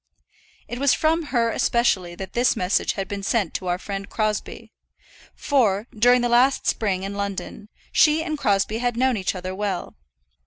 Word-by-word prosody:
It 240 - -6
was 280 -1 +3
from 320 +1 +1
her 235 -5 +1
especially 190 -9 +1
that 190 +1 -8
this 245 +1 +2
message 180 +3 0
had 195 -1 -4
been 200 -1 -5
sent 200 -3 0
to 185 - -4
our 175 0 0
friend 200 +1 -6
Crosbie; 215 -1 -3 0.6
for, 220 -8 +1
during 245 +3 +4
the 240 - +1
last 245 +3 +3
spring 190 -4 0
in 195 +1 -4
London, 200 +1 -5 0.2
she 310 +1 +4
and 315 -2 -3
Crosbie 210 -4 0
had 245 -1 -1
known 260 0 +2
each 190 -2 -2
other 185 0 -5
well. 195 -2 -4
215 Hz, 170 wpm, -23 LUFS, 195-245 Hz, 0.6 s, during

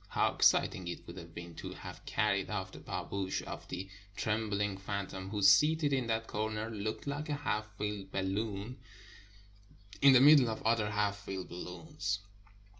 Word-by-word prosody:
How - - +1
exciting 90 -2 +3
it 85 - -6
would 85 - -9
have 85 -2 -10
been 85 0 -7
to - - -6
have - - -9
carried 100 -2 +1
off 95 -3 -3
the - - -10
pahhoush 95 -1 -3
of - - -7
the 95 +2 -5 0.3
trembling 105 -2 -1
phantom, 95 -1 -4
who, 105 -1 -2
seated 150 +9 +5
in 130 -3 +1
that 115 0 0
corner, 110 +1 -2
looked 110 0 -4
like 145 +2 -3
a 145 - 0
half 105 -7 -1
filled 105 -2 -4
bal 95 - -1
loon 105 +4 -3 1.2
in 140 -1 +8
the 130 - +8
middle 140 -2 +8
of 110 - -4
other 110 -2 +2
half 105 -1 0
filled 95 -2 -6
balloons. 100 - -4
105 Hz, 170 wpm, -33 LUFS, 95-115 Hz, 1.2 s, in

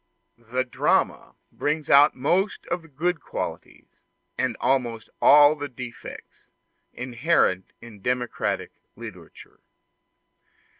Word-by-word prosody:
The 130 +1 +1
drama 125 - 0 0.2
brings 150 0 -2
out 145 +2 +6
most 180 +10 0
of 175 0 0
the 165 - -16
good 160 +4 -2
qualities, - - -7 0.3
and - - -1
almost 120 -4 0
all 145 +1 +8
the 145 -1 -5
defects, 125 -2 -10 0.4
inherent 125 - 0
in 115 -4 -13
democratic 125 +1 -2 0.2
literature. 100 -8 -12
130 Hz, 100 wpm, -25 LUFS, 120-150 Hz, 0.4 s, all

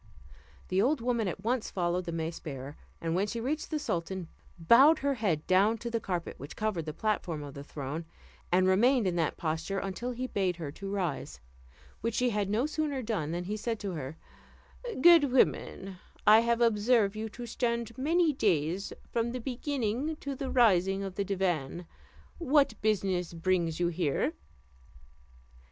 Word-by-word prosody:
The 185 +1 +2
old 270 +6 +2
woman 235 -2 0
at 185 +2 -5
once 240 +1 0
followed 180 0 -1
the 170 - -4
mace 165 0 -3
bearer, 140 -1 -7 0.2
and 165 -1 -2
when 190 +4 +1
she 230 +2 -3
reached 290 +6 -2
the 310 - -1
sultan 175 - -3 0.3
bowed 255 - +6
her 280 -1 0
head 195 - -1
down 200 +5 +3
to 235 +1 -5
the 230 - 0
carpet 180 -5 -4
which 140 +3 -8
covered 210 -7 -2
the - - -2
platform 175 -6 -2
of 140 -1 -8
the 140 - -8
throne, 145 +3 -5 0.5
and 185 +1 +4
remained 235 +5 +4
in 180 -2 0
that 165 -3 0
posture 165 +4 -2
until 195 +6 -3
he 250 +1 -3
bade 190 -7 0
her 160 -4 -6
rise, 195 -6 -3 0.6
which 230 -1 -1
she 250 -1 +2
had 205 -2 -1
no 220 +6 +1
sooner 300 -3 -2
done, 205 -10 -2
than 175 +2 -2
he 205 +4 -3
said 225 +1 -3
to 200 -2 -3
her, 150 -2 -6 0.8
"Good 330 -4 +7
woman, 195 -6 +1 0.3
I 215 +1 +8
have 235 +1 +1
observed 220 -2 +3
you 220 +1 -4
to 240 +3 -8
stand 235 -1 -2
many 315 +4 +2
days 185 - 0 0.2
from 235 0 0
the 255 - -3
beginning 260 +2 -2
to 280 -2 -5
the 265 0 -4
rising 195 -5 +3
of 195 -1 -5
the 200 - -1
divan; 180 -5 -1 0.5
what 285 -6 +3
business 190 -5 0
brings 170 -1 0
you 175 -1 +2
here?" 165 -4 0
200 Hz, 175 wpm, -30 LUFS, 175-240 Hz, 0.8 s, I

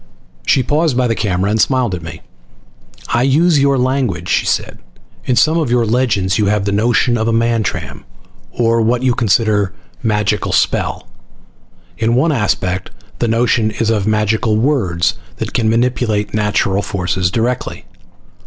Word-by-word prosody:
She 130 - +3
paused 150 0 0
by 130 - +2
the 115 - +1
camera 100 -2 -1
and 110 0 +2
smiled 130 -6 +1
at 90 - -4
me. 80 -1 -9 0.9
"I 120 - +1
use 150 +5 +3
your 140 0 +2
language," 125 - -1
she - - +1
said. - - -2 0.5
"In 125 - +1
some 160 +6 +3
of 155 -6 -1
your 120 -1 +2
legends 110 -5 0
you 105 - +2
have 105 -1 0
the 100 - 0
notion 120 +3 +1
of 110 - -1
a - - +2
Mantram, 115 -5 -1 0.5
or 115 -1 +1
what 120 +3 +1
you 130 -1 +3
consider 105 -3 +1 0.3
magical 105 -2 0
spell. - - 0 0.9
In 115 +1 +1
one 150 +6 +2
aspect 95 -7 -1 0.3
the 120 - 0
notion 115 -1 +1
is 110 +1 -1
of 105 -2 0
magical 110 0 +1
words 95 - 0 0.2
that 110 +4 -5
can 115 -3 +1
manipulate 115 -2 0
natural 105 -2 0
forces 90 -2 -1
directly. 120 +5 -2
110 Hz, 155 wpm, -16 LUFS, 105-125 Hz, 0.9 s, She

